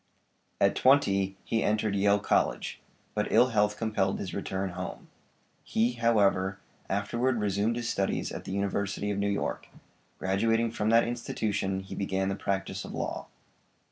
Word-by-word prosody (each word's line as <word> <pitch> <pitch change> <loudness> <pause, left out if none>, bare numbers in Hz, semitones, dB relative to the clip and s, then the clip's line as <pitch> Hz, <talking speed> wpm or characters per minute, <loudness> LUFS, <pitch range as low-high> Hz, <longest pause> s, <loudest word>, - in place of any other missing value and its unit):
At - - +4
twenty 100 -8 +3
he 115 - 0
entered 105 -1 +1
Yale 100 +1 +4
College, 100 - 0 0.3
but - - -1
ill 125 - +5
health 105 -2 +2
compelled 105 -4 0
his 95 - -5
return 95 -1 -3
home. 90 +1 -7 0.5
He, 115 +2 +1
however, 100 -5 +2 0.3
afterward 120 +5 0
resumed 105 +2 +1
his 120 -1 -3
studies 100 -4 -1
at - - -7
the - - -5
University 100 +1 -1
of 100 - -2
New 100 0 +1
York; 100 - -2 0.5
graduating 115 +4 +1
from 110 -1 -1
that 115 +1 +5
institution 105 -5 -2
he 95 - -9
began 95 -1 -1
the 100 - -1
practice 100 -1 -2
of - - -7
law. - - -3
100 Hz, 150 wpm, -29 LUFS, 95-115 Hz, 0.5 s, ill